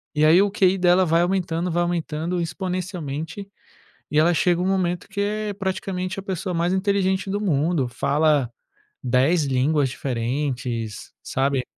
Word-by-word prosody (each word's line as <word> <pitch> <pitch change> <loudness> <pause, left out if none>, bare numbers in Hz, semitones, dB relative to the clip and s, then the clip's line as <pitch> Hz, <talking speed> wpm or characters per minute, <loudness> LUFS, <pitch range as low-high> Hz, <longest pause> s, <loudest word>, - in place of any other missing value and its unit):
E 150 +1 +3
aí 160 +4 +6
o 205 - +1
QI 195 -1 +2
dela 180 +1 +4
vai 165 0 +3
aumentando, 175 -1 -1
vai 175 +1 +1
aumentando 170 0 -2
exponencialmente, 175 0 -4 0.6
e 150 - +3
ela 170 +3 +4
chega 175 +1 +2
um 185 - 0
momento 180 -2 0
que 200 0 -6
é 210 0 -2
praticamente 190 -1 -3
a - - -7
pessoa 190 -1 -3
mais 170 +2 +1
inteligente 190 0 0
do 200 +1 -1
mundo, 155 -5 +1
fala 140 +1 +1 0.5
10 135 +6 +2
línguas 135 +2 +1
diferentes, 125 -3 -3
sabe. 135 -1 0
175 Hz, 150 wpm, -23 LUFS, 145-190 Hz, 0.6 s, aí